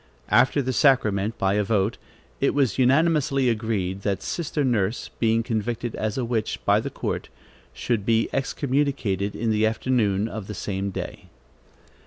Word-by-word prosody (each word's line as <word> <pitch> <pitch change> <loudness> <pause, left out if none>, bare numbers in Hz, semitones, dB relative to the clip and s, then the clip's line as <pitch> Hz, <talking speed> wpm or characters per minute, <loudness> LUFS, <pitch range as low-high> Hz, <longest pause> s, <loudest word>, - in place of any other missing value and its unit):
After 130 +6 +4
the 130 +1 -1
sacrament, 110 -6 +2
by 95 0 +1
a 105 0 +2
vote, 105 +1 0 0.4
it 140 - +1
was 135 -5 +1
unanimously 135 -1 +3
agreed, 105 -5 -1
that 100 -1 -2
sister 155 -3 -2
Nurse, 115 -4 0
being 115 0 +2
convicted 115 0 -2
as 110 +1 -2
a 130 - 0
witch 115 - -1
by - - +4
the - - -4
court, - - -4 0.4
should 115 -5 -2
be 115 +1 +2
excommunicated 135 -8 -1
in 115 0 0
the 110 0 +3
afternoon 110 -3 +1
of 110 -3 -6
the 105 - -6
same 100 +1 -3
day. 95 - -7
115 Hz, 155 wpm, -24 LUFS, 105-130 Hz, 0.4 s, After